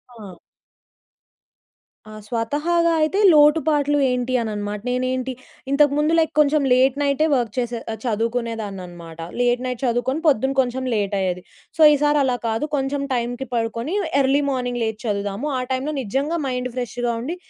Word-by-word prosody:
ఆ! 195 -6 -11 1.7
ఆ! - - -11 0.2
స్వతహాగా 300 +9 0
అయితే, 350 +7 +1
లోటుపాట్లు 295 -1 +4
ఏంటి 250 0 -1
అననమాట. 210 -2 -4
నేనేంటి 255 +1 -1 0.4
ఇంతకు 285 0 +4
ముందు 305 +2 +2
లైక్ 320 - +1
కొంచెం 300 0 +4
లేట్ 260 +1 +3
నైటే 285 +2 +2
వర్క్ 235 -4 -1
చేసే 240 -1 -2 0.3
చదువుకునేదాన్ననమాట. 205 -7 -4 0.2
లేట్ 245 0 +2
నైట్ 250 -1 -4
చదువుకొని, 245 +5 0
పొద్దున 270 -1 +2
కొంచెం 255 +1 -3
లేట్ 200 -1 -1
అయ్యేది. 180 -1 -1 0.4
సో, - - 0
ఈసారి 295 0 +2
అలా 250 -2 0
కాదు 225 +6 -1
కొంచెం 275 +1 -1
టైంకి 245 +2 -3
పడుకొని, 230 - -2 0.3
ఎర్లీ 270 +2 +2
మార్నింగ్ 245 -2 -2
లేచి 220 -1 -3
చదువుదాము. 205 +5 -2
ఆ - - -1
టైంలో 270 +4 -1
నిజంగా 280 +9 -2
మైండ్ 250 -1 -3
ఫ్రెష్‌గా 245 -1 -2
ఉండి, 320 +8 -4
250 Hz, 140 wpm, -21 LUFS, 225-285 Hz, 1.7 s, లోటుపాట్లు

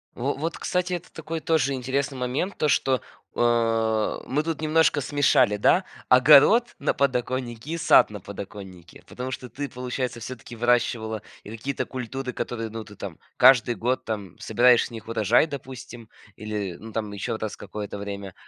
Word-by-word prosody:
Во 135 +4 -1
вот, 160 +4 -4
кстати, 180 0 -1
это 175 0 -7
такой 160 +1 -5
тоже 155 -4 +1
интересный 135 +2 -2
момент 130 +10 -2
то, 155 - +1
что, 130 -2 +2 0.4
э, 115 -2 +1
мы 145 +3 0
тут 160 -1 -3
немножко 155 -1 +3
смешали, 130 -6 +3
да, 180 - +3 0.2
огород 150 - +6
на - - +1
подоконнике, 125 -1 -1
и 170 - -2
сад 155 - +5
на 105 - -7
подоконнике. 95 -3 -10
Потому 125 +1 -6
что 125 -1 -6
ты, 145 +3 -5
получается, 125 -1 -4
всё-таки 120 0 -8
выращивала 115 -2 +1 0.2
и - - -9
какие-то 115 +5 -3
культуры, 130 +1 -5
которые, 115 -3 -4
ну, 115 +1 -6
ты 105 -1 -14
там 95 -5 -7 0.2
каждый 125 -2 +6
год 125 +5 -1
там 105 -6 -5
собираешь 120 +2 +4
с - - -11
них 115 -2 -9
урожай, 115 +5 +3
допустим 130 -5 -9 0.3
или 105 -4 -4
ну 110 +1 -10
там 105 -2 -3
еще 110 +3 -3
раз 110 -1 -5
какое-то 105 -1 -7
время. 100 -2 -6
120 Hz, 165 wpm, -25 LUFS, 110-140 Hz, 0.4 s, огород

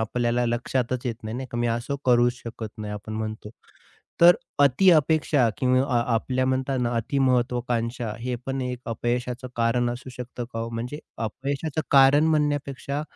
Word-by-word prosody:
आपल्याला 120 +2 0
लक्षातच 125 +1 -1
येत 120 - -1
नाही, 110 +2 -5
नाही 130 - -5
का? 120 - -4
मी 120 - +1
असं 120 +4 -1
करूच 120 -1 +4
शकत 115 -1 -6
नाही, 105 -1 -5
आपण 105 +1 -7
म्हणतो. 110 -1 -5 0.7
तर 175 +1 +9 0.3
अतिअपेक्षा 150 -3 +4
किंवा 130 0 +3 0.2
अ - - +5
आपल्या 130 +3 0
म्हणता 130 +1 0
ना 120 -1 0
अतिमहत्वाकांक्षा 120 -2 0
हे 125 +1 -2
पण 135 0 -2
एक 125 -1 -3
अपयशाचं 120 +2 -2
कारण 120 +1 +1
असू 125 +2 -7
शकतं 125 0 -7
का 115 - -4
हो? 115 0 -3
म्हणजे 120 +6 -5 0.3
अपयशाचं 140 +6 -3
कारण 140 +2 +6
म्हणण्यापेक्षा, 145 -2 -1
125 Hz, 155 wpm, -25 LUFS, 120-135 Hz, 0.7 s, तर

